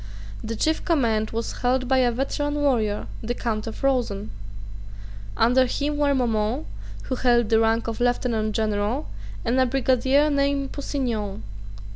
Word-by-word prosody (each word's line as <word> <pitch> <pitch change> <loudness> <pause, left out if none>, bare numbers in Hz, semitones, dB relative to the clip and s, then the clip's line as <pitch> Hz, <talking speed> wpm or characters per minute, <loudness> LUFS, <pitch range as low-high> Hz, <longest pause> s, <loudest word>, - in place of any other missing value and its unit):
The 230 +1 -3
chief 315 +8 0
command 230 -10 +1
was 230 +1 -4
held 255 +1 +1
by 265 0 +3
a 245 -1 +3
veteran 290 +4 -2
warrior, 240 -8 +1 0.2
the 240 +2 -3
Count 225 -2 -3
of 225 - -7
Rosen. 240 - 0 1.1
Under 250 +3 +4
him 290 +4 -2
were 285 -1 +2
Maumont, 220 - 0 0.4
who - - -4
held 240 -3 +3
the 225 - +4
rank 225 +1 +1
of 230 +1 -4
lieutenant 240 -3 0
general, 215 +5 -1 0.4
and 245 +2 +2
a 260 - +4
brigadier 270 +3 +2
named 280 -1 0
Pusignan. 235 - -3
245 Hz, 145 wpm, -24 LUFS, 225-275 Hz, 1.1 s, Under